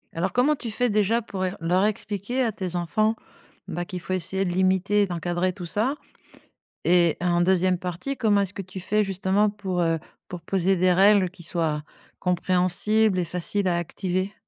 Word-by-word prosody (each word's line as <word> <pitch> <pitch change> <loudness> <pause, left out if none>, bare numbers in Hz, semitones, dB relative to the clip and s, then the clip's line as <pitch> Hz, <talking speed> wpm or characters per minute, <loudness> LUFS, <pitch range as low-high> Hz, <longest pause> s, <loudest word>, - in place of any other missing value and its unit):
Alors, 175 +2 -1
comment 270 +5 +3
tu 245 -4 -6
fais 245 +3 +1
déjà 210 +3 +2
pour 195 -4 -5
ér 185 - -3
leur 180 +4 +2
expliquer 215 +4 -2
à 230 - 0
tes 185 -3 -4
enfants, 215 +6 +1 0.5
bah 175 - -3
qu'il 180 0 -6
faut 185 - -4
essayer 190 +2 0
de 175 - -1
limiter 190 +3 +2
et - - +2
d'encadrer 175 +1 -1
tout 180 -2 -8
ça? 220 - 0 0.9
Et 170 -2 +4
en 175 -1 +1
2e 185 0 +2
partie, 180 +11 -4
comment 210 -4 +3
est-ce 195 -1 -1
que 195 - -5
tu 190 0 -9
fais 210 +3 +1
justement 195 +2 +1
pour, 195 -3 -3
heu, 165 -1 +1 0.3
pour 180 - -7
poser 190 0 +1
des 185 0 +3
règles 195 0 +5
qui 180 -1 -15
soient, 155 -3 -1 0.4
compréhensibles 185 +3 +1
et - - 0
faciles 180 +3 -1
à 175 - +1
activer? 185 +3 -2
185 Hz, 185 wpm, -25 LUFS, 175-205 Hz, 0.9 s, règles